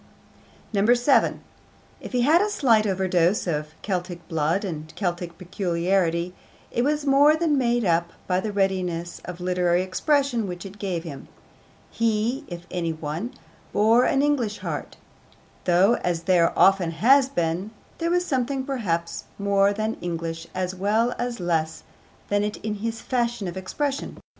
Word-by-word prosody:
7. 240 +6 +3 0.6
If - - -9
he 250 -2 +1
had 310 +8 +5
a 420 - +1
slight 230 - +3
overdose 185 -1 +1
of 150 -2 -3
Celtic 180 -3 -3
blood 165 +4 0
and 155 -4 -5
Celtic 175 -3 -3
peculiarity, 175 -1 0 0.4
it 240 - 0
was 295 +1 0
more 285 +2 +6
than 315 -2 +1
made 240 -3 +1
up 170 -1 +2 0.2
by 180 -1 +1
the 210 +3 -3
readiness 185 -4 -1
of 180 0 -7
literary 180 0 +1
expression 240 +3 +1
which 180 +1 -6
it 195 +1 -10
gave 180 -5 -2
him. 145 -6 -8 0.6
He, 230 +5 0
if 175 -1 -8
any 170 -2 -1
one, 160 - -5 0.4
bore 225 +4 +4
an 275 0 +2
English 250 -8 +1
heart, - - -5 0.7
though, 185 +6 +4
as 170 -2 -2
there 170 -1 +4
often 190 -3 +5
has 255 - +4
been, 175 -2 -1 0.3
there 335 0 0
was 355 +1 +1
something 265 -2 -1
perhaps 170 -11 -2
more 200 0 +3
than 215 +2 -2
English 165 -1 -4
as 185 0 -1
well 215 +6 +1
as 240 -2 -3
less 160 -3 -1 0.4
than 205 0 +1
it 210 0 -2
in 215 - -1
his 225 0 -3
fashion 240 -5 -1
of 175 - -5
expression. 275 +9 -3
195 Hz, 150 wpm, -24 LUFS, 175-240 Hz, 0.7 s, more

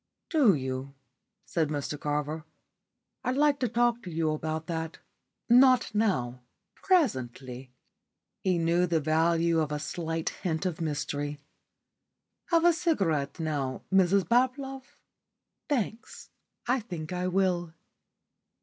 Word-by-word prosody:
"Do 275 - +5
you?" 130 0 -4 0.5
said 160 -3 0
Mr 145 0 -3
Carver. 150 +1 -2 0.8
"I'd 255 +1 -1
like 290 -1 +3
to 250 - +1
talk 240 +1 +2
to 185 - -8
you 160 -1 0
about 155 +1 -3
that. 165 -1 -4 0.5
Not 250 0 +5
now 130 - 0 0.3
presently." 130 - 0 0.7
He 185 -2 +1
knew 170 +2 +2
the 165 -2 +2
value 165 +2 +2
of 155 -2 -1
a 150 - -1
slight 165 +2 -3
hint 170 -1 -3
of 175 -2 -2
mystery. 145 -1 -3 1.1
"Have 335 -1 +3
a 345 - +7
cigarette 185 - 0
now, 145 -5 -2
Mrs 190 -1 +4
Bablove?" 260 +2 0 0.7
"Thanks. 235 -5 -3 0.3
I 250 +2 +2
think 175 -7 -6
I 180 0 -1
will." 180 -3 0
170 Hz, 120 wpm, -28 LUFS, 150-235 Hz, 1.1 s, a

